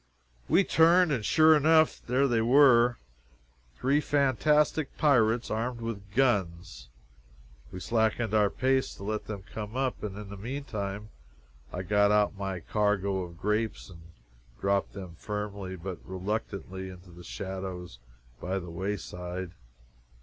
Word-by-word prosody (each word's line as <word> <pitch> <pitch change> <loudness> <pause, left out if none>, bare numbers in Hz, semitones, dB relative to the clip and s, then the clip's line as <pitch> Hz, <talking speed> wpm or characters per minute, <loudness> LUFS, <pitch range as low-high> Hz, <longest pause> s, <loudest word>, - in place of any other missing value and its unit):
We 195 - +5
turned, 170 0 +4
and, 125 -6 -1
sure 155 +6 +5
enough, 155 +1 +4
there 130 +3 +2
they 120 -3 +1
were 120 -1 +5 0.8
three 140 - +1
fantastic 150 +1 +1
pirates 120 -5 +3
armed 115 +2 -2
with 100 -3 -6
guns. 95 - 0 0.8
We 90 - -7
slackened 110 +2 0
our 105 -2 +4
pace 130 +3 0
to 100 - -11
let 105 +1 -3
them 100 -3 -6
come 105 +3 -7
up, 130 -1 -1
and 100 -2 -5
in 105 -1 -8
the 100 - -8
meantime 105 -4 -5 0.6
I 90 - -4
got 100 +2 +3
out 105 -1 +2
my 95 -2 -4
cargo 100 -2 0
of 85 -2 -8
grapes 105 +1 -2
and 85 -2 -13 0.6
dropped 100 +7 0
them 90 -4 -9
firmly 100 -2 -5
but 90 -1 -6
reluctantly 95 0 -4
into 90 -1 -13
the 85 +1 -13
shadows 95 -7 -6 0.4
by 95 +6 -2
the 90 -3 -6
wayside. 90 -1 -5
105 Hz, 135 wpm, -28 LUFS, 95-125 Hz, 0.8 s, We